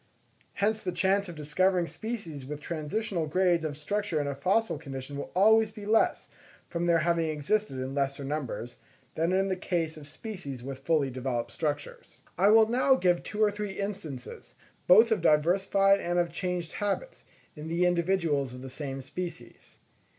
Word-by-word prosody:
Hence 215 +1 0
the 180 - -2
chance 195 +2 +1
of 170 - -8
discovering 175 +4 +1
species 175 - -6
with 145 +3 -6
transitional 170 +3 -3
grades 175 +1 +2
of 150 -2 -3
structure 200 +1 -1
in 145 - -1
a 140 - -2
fossil 185 +5 +1
condition 135 -2 -7
will 140 - -5
always 220 +3 +5
be 215 -1 -10
less, 220 +2 +2 0.4
from 170 0 -2
their 170 -1 +5
having 165 0 +1
existed 155 +4 0
in 130 +1 -4
lesser 140 0 -1
numbers, 135 -4 -4 0.3
than 165 +2 0
in 190 +1 +2
the 190 - 0
case 170 -4 -2
of 145 -2 -10
species 170 - -7
with 135 0 -6
fully 140 -1 +1
developed 120 -2 -3
structures. 145 +2 -4 0.2
I 185 +4 +3
will 220 +1 +7
now 260 +3 +4
give 180 -7 +2
two 215 +1 -1
or 210 - +4
three 205 -1 -4
instances, 190 -11 -6 0.3
both 225 +6 +7
of 215 -5 +2
diversified 190 +5 +4
and 175 -1 -1
of 175 -1 +1
changed 180 -3 -3
habits, 210 - -3 0.3
in 150 0 -7
the 170 +2 +1
individuals 170 -7 +1
of 125 - -10
the 130 - -8
same 135 -1 -5
species. 180 +5 -8
170 Hz, 170 wpm, -29 LUFS, 145-200 Hz, 0.4 s, will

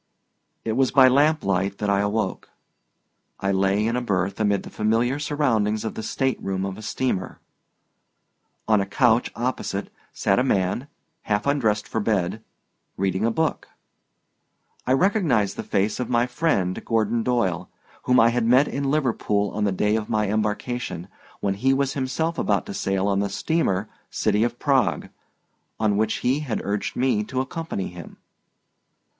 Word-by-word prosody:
It 115 - 0
was 130 +3 +2
by 130 -2 +6
lamplight 100 -9 +2
that 105 -1 0
I 100 - +2
awoke. 100 -1 -1 0.9
I 95 - 0
lay 95 +2 +2
in 115 +2 0
a 125 - 0
berth 95 -4 -1
amid 105 -2 +1
the - - -10
familiar 115 +6 +1
surroundings 115 -8 0
of 110 - -3
the - - -5
stateroom 95 -7 -1
of 95 -1 -4
a 110 - -10
steamer. 110 -3 -2 1.3
On 110 -2 +4
a 95 - -3
couch 120 +3 +2
opposite 125 +2 -3 0.2
sat 95 - +1
a - - +3
man, 100 +2 0 0.4
half 105 -1 +1
undressed 115 -7 +1
for 110 - -2
bed, 105 -1 0 0.6
reading 95 +2 0
a - - +3
book. 160 +7 -1 1.2
I 130 - +4
recognized 135 - +2
the - - -4
face 100 +2 0
of 125 - -3
my 120 0 +3
friend 125 - 0
Gordon 115 0 +1
Doyle, 95 -8 0 0.4
whom 125 0 +4
I 115 - +6
had 115 -1 0
met 130 +4 +5
in 140 0 -2
Liverpool 115 -8 0
on 105 0 -1
the 100 - +1
day 105 +3 +1
of 110 -1 -3
my 105 -2 +1
embarkation, 105 -3 -2 0.3
when 100 -1 +1
he 130 +7 +2
was 135 0 0
himself 160 +5 -2
about - - +1
to 210 - -6
sail 95 - -1
on 100 -1 +1
the 100 0 0
steamer 105 - 0 0.2
City 105 - +1
of 120 0 -1
Prague, 135 -2 +1 0.7
on 110 -2 +2
which 110 +1 +1
he 130 +4 +2
had 130 -8 -3
urged 100 0 -2
me 125 -4 +1
to 130 - -3
accompany 135 - -3
him. 85 -2 -11
110 Hz, 160 wpm, -24 LUFS, 100-130 Hz, 1.3 s, by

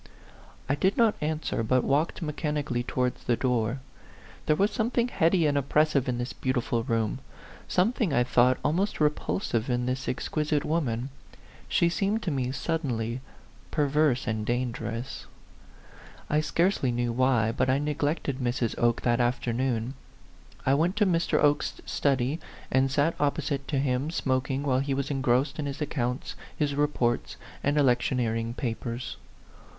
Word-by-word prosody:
I 135 - +2
did 190 +7 +1
not 230 -3 +5
answer, 155 -5 -1
but 125 +3 +2
walked 150 +5 0
mechanical 150 -3 -2
ly 120 - +1
towards 125 -1 -1
the 120 - +2
door. 125 0 0 0.7
There 155 - +4
was 200 +6 +2
something 235 +2 0
heady 170 -4 +3
and 145 -1 +2
oppressive 140 -1 +2
in 125 - 0
this 120 +1 -3
beautiful 125 -2 -1
room; 115 -2 -1 0.5
something, 210 - +1
I 125 -3 +3
thought, 125 +1 +4
almost 180 +8 +1
repulsive 150 - 0
in 125 0 0
this 130 +1 -2
exquisite 150 +3 -1
woman. 135 -6 -1 0.6
She 170 - +3
seemed 200 +5 0
to 175 - -1
me, 130 -3 -1
sud 165 +5 -1
denly, 115 -4 -2 0.5
perverse 145 -3 +2
and 110 -2 -1
dangerous. 120 +1 -3 1.0
I 150 +1 +3
scarcely 165 -4 +1
know 120 0 0
why, 120 -2 +2
but 130 +2 0
I 130 - +3
neglected 145 -1 -1
Mrs. 120 -2 0
Oke 120 -1 +2
that 120 0 +2
afternoon. 120 0 0 0.7
I 135 - +4
went 165 +7 +2
to 210 -1 +3
Mr. 170 -3 +2
Oke's 145 0 +2
study, 135 +2 0 0.3
and 130 +1 +3
sat 145 +5 +2
opposite 140 -1 -1
to 145 - -1
him 135 +1 0
smoking 135 -3 -1
while 130 -3 +2
he 135 0 -1
was 140 +1 -2
engrossed 135 +2 +1
in 145 - -1
his 140 0 -5
accounts, 130 -4 -2 0.2
his 145 -2 0
reports, 140 -5 0 0.3
and 145 +2 +1
electioneering 120 -3 +1
papers. 120 0 -4
135 Hz, 150 wpm, -27 LUFS, 125-150 Hz, 1.0 s, not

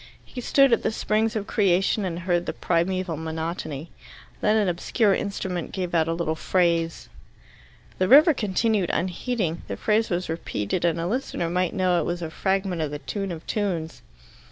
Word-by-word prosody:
He 250 - -7
stood 275 +1 +4
at 230 - +3
the - - 0
springs 220 +1 0
of 210 -2 -2
creation 195 0 +2
and 175 -1 -3
heard 175 -1 0
the - - -2
primeval 180 0 0
monotony. 160 -1 -4 0.5
Then 215 +1 +3
an 210 -2 +2
obscure 195 +4 +1
instrument 190 -4 -3
gave 180 -3 -3
out 165 -1 +3
a 165 - 0
little 165 -2 -1
phrase. 165 0 0 0.9
The 185 - +2
river 300 - +8
continued 210 -3 0
unheeding. 180 0 -2
The - - -4
phrase 220 +1 +1
was 180 0 -1
repeated 160 - -2
and 170 -1 +1
a 165 - -2
listener 180 -5 -2
might 180 -1 0
know 180 -2 +2
it - - -1
was 175 0 -3
a 160 - -5
fragment 190 -1 -1
of 155 - -1
the 145 - -4
Tune 195 +5 -4
of 165 -1 -7
tunes. 175 -7 -2
180 Hz, 180 wpm, -25 LUFS, 165-205 Hz, 0.9 s, river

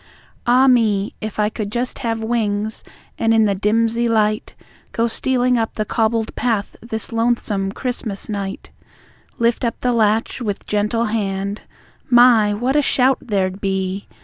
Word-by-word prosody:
Ah 250 +2 +5
me! 220 -6 +2
If 215 -1 -5
I 210 0 +2
could 210 -2 -5
just 245 +4 -2
have 225 -3 -2
wings, 220 -2 -1 0.4
and 225 0 +3
in 220 -1 +4
the 200 - +2
dimsey 230 +4 +1
light 215 -1 0 0.4
Go 230 - +1
stealing 250 +1 +1
up 225 - -2
the 215 - -1
cobbled 225 0 0
path 225 -4 -1
this 220 0 -5
lonesome 225 -4 0
Christmas 230 -4 -4
night, 200 -2 -5 0.7
Lift 235 +1 +1
up 235 - -1
the 250 -1 +1
latch 220 +2 +1
with 205 -4 -3
gentle 210 +3 0
hand 200 -2 -2 0.5
My! 240 -4 +6
What 245 +6 -1
a 295 - +5
shout 260 -1 +2
there'd 195 -4 -2
be! 190 0 -2
220 Hz, 150 wpm, -20 LUFS, 205-240 Hz, 0.7 s, My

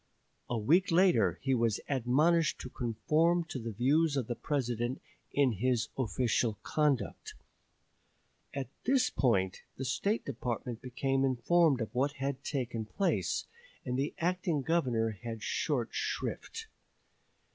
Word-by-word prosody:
A 120 - 0
week 165 - +3
later 165 - +4
he 135 -1 +2
was 115 -4 +1
admonished 150 +6 +2
to 130 - -7
conform 155 +9 +1
to 150 -5 -6
the 115 -1 -4
views 140 +7 +2
of 130 - 0
the 120 - -3
President 120 -2 -2 0.3
in 140 -3 +3
his 115 +2 0
official 115 -3 0
conduct. 150 -4 0 1.2
At 135 -4 -4 0.2
this 260 0 +3
point 95 -7 +1 0.2
the 135 - -4
State 200 - 0
Department 120 -2 -4
became 135 +1 0
informed 135 +2 +3
of 110 0 -4
what 135 +3 +1
had 140 -1 -3
taken 120 -5 -2
place, 190 - 0 0.4
and 125 -1 -1
the 140 +3 -1
acting 170 -4 0
Governor 125 -9 +1
had 115 -2 -6
short 125 -1 -1
shrift. 450 - -3
130 Hz, 130 wpm, -32 LUFS, 120-155 Hz, 1.2 s, later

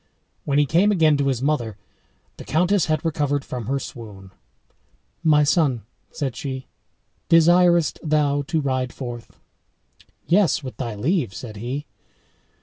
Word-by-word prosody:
When 140 -1 +1
he 145 - +4
came 175 +9 +3
again 160 -6 +4
to 140 -1 0
his 130 -2 -1
mother, 120 -8 -1 0.6
the - - -9
countess 180 +4 +2
had 155 0 -1
recovered 145 -3 0
from 120 -4 -6
her 135 +2 0
swoon. 105 -7 -9 0.9
"My 150 -2 +5
son," 145 -6 +2 0.3
said 135 -6 -4
she, 130 -2 -5 0.6
"desirest 170 0 +4
thou 150 -2 +1
to 160 -2 0
ride 130 -2 -1
forth?" 120 -3 -8 0.9
"Yes, 175 -5 +2
with 130 - -8
thy 120 -5 -4
leave," 130 - -1
said 110 -4 -8
he. 130 +7 -4
145 Hz, 140 wpm, -22 LUFS, 125-160 Hz, 0.9 s, My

